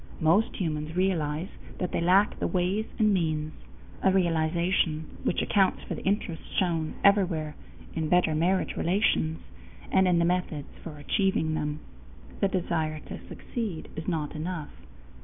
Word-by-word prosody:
Most 170 +8 +3
humans 155 -3 -2
realize 175 -2 0 0.3
that 180 - -2
they - - 0
lack 190 +4 +4
the - - 0
ways 190 +4 0
and 215 -2 +4
means, 155 -4 0 0.5
a 190 - +4
realization 170 -2 +1 0.2
which - - +1
accounts 195 -2 +2
for - - -5
the - - -5
interest 190 -4 -1 0.2
shown 165 -4 0
everywhere 180 -7 +3 0.4
in 160 -1 -2
better 180 -2 +4
marriage 175 +5 +1
relations 170 -3 +1 0.5
and 190 0 +4
in 180 -1 +4
the 170 - +3
methods 175 -4 -2
for 155 -3 -8
achieving 160 0 +1
them. 150 -1 -2 0.6
The 200 - +3
desire 165 -5 -1
to - - -9
succeed 215 - -5
is 160 0 -6
not 155 -4 -1
enough. 160 -1 -4
170 Hz, 145 wpm, -28 LUFS, 155-190 Hz, 0.6 s, lack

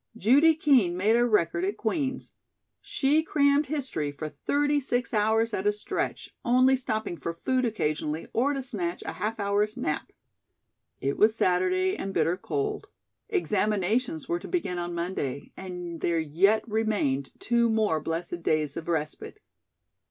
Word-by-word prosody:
Judy 285 - +5
Kean 255 - +3
made 210 +5 +3
a 240 - +4
record 170 -6 +1
at 200 +3 -1
Queen's. 265 +3 -2 0.5
She 315 -8 +2
crammed 285 -2 +2
history 260 - -2
for 155 +2 -6
thirty 290 - 0
six 245 -3 -1
hours 220 +1 +2
at 190 +1 -1
a - - +5
stretch, 210 0 -4
only 255 +2 +4
stopping 220 -7 -3
for 170 0 -4
food 255 -1 +2
occasionally 155 -7 -2
or 270 +5 +2
to 270 -1 -3
snatch 180 -8 -3
a - - -4
half 220 +1 -3
hour's 205 +1 0
nap. 150 - -3 0.9
It 140 +1 -1
was 215 +1 +5
Saturday 185 -1 +2
and 195 0 -5
bitter 170 - +2
cold. 420 - -3 0.4
Examinations 210 - 0
were 170 - -1
to - - -9
begin 330 - -2
on 175 0 -4
Monday, 170 -6 -3
and 180 -3 -7
there 170 -1 +1
yet 180 +9 +2
remained 210 -12 0
two 235 0 +2
more 215 -8 +1
blessed 170 +2 -4
days 155 -3 0
of 165 - -6
respite. 160 - -3
210 Hz, 150 wpm, -27 LUFS, 170-255 Hz, 0.9 s, Judy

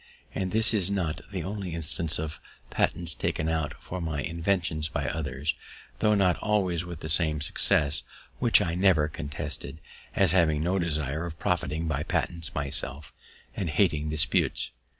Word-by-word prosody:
And 95 -1 -2
this 110 +1 +5
is 100 -4 +2
not 90 -6 -1
the - - -4
only 95 -4 -4
instance 85 0 +2
of 80 +1 -4 0.3
patents - - +1
taken 75 - -2
out 80 -2 -1
for 90 0 -6
my 80 -3 -2
inventions 85 -2 -1
by 70 -2 -2
others, 70 0 -2 0.5
tho' 105 -1 +3
not 95 -4 +2
always 95 -6 +1
with 85 -3 -8
the - - -5
same 80 -1 +2
success, 75 0 +2 0.4
which - - +4
I 85 - -2
never 90 -4 +3
contested, 75 0 -5 0.4
as 95 -5 +4
having 80 -4 +3
no 95 +3 +1
desire 75 -3 -1
of 80 -2 -8
profiting 80 +2 -1
by 75 -2 -1
patents 85 +1 -1
myself, 70 +1 -2 0.4
and 90 - -2
hating 75 -2 +1
disputes. 75 -1 +2
80 Hz, 155 wpm, -27 LUFS, 75-90 Hz, 0.5 s, this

